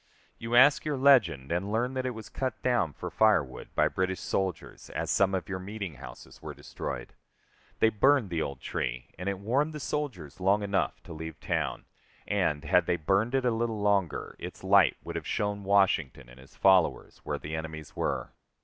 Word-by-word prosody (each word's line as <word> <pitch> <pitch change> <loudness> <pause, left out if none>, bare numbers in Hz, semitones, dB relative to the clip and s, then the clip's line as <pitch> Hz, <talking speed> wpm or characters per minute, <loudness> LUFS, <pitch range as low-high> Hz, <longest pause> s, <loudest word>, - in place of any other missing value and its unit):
You 115 +1 -2
ask 140 +4 +6
your 150 -2 -2
legend, 105 - +4
and 95 +4 -1
learn 120 +4 0
that 130 -1 -2
it 125 - -4
was 110 -1 -8
cut 130 -3 -3
down 120 -11 +2
for - - -7
firewood 85 -13 +2
by - - +4
British 95 0 -2
soldiers, 95 -3 -3
as - - -3
some 95 -1 +3
of 95 - -3
your 95 -2 -4
meeting 100 -2 -6
houses 65 -3 -12
were - - -7
destroyed; - - -6 0.6
they 110 - +4
burned 115 -1 +3
the 80 -2 0
old 70 -3 -4
tree, - - -4
and 90 +2 -2
it 100 - -2
warmed 135 +10 0
the 150 - -6
soldiers 120 - -4
long 100 +3 +3
enough 100 -1 -1
to - - -9
leave 80 0 -7
town, - - -2 0.4
and, 75 0 0
had 85 +3 +3
they - - +2
burned 100 - +1
it 130 -1 +1
a 125 - +3
little 115 -1 -1
longer, 100 -5 0
its - - -8
light - - +5
would - - -7
have - - -4
shown 105 -1 -1
Washington 90 -10 +2
and 60 +1 -15
his 65 - -17
followers 95 -3 +3
where - - -2
their 75 +2 -6
enemies 80 -1 -7
were. - - -2
100 Hz, 195 wpm, -29 LUFS, 80-115 Hz, 0.6 s, ask